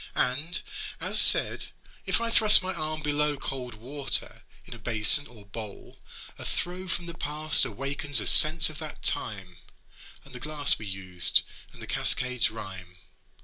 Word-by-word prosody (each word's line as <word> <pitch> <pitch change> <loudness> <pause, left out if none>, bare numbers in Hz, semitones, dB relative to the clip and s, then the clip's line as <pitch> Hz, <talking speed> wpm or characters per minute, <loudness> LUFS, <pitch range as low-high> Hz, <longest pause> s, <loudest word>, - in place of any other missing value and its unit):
And, 150 +7 -3 0.4
as - - 0
said, - - +5 0.4
if - - -1
I 230 0 -5
thrust 215 -3 +5
my 190 +1 -4
arm 155 0 -6
below 150 0 -2
Cold 125 -4 -8
water 135 +4 -1 0.2
in - - -12
a - - -13
basin 115 +5 +3
or 110 -4 -17
bowl, 105 0 -12 0.4
a - - -9
throe 180 +1 -5
From 175 0 -5
the 170 - -9
past 150 -3 +2
awakens 140 +3 -1
a 105 - -6
sense 155 - +5
of 150 - -13
that 155 -2 -11
time, 95 -4 -4 0.7
And 140 - -17
the 125 - -10
glass 145 +2 +2
we 105 - -9
used, 95 -2 0 0.3
and - - -15
the - - -9
cascade's 125 -3 -1
rhyme. 95 -4 -12
135 Hz, 160 wpm, -25 LUFS, 110-155 Hz, 0.7 s, said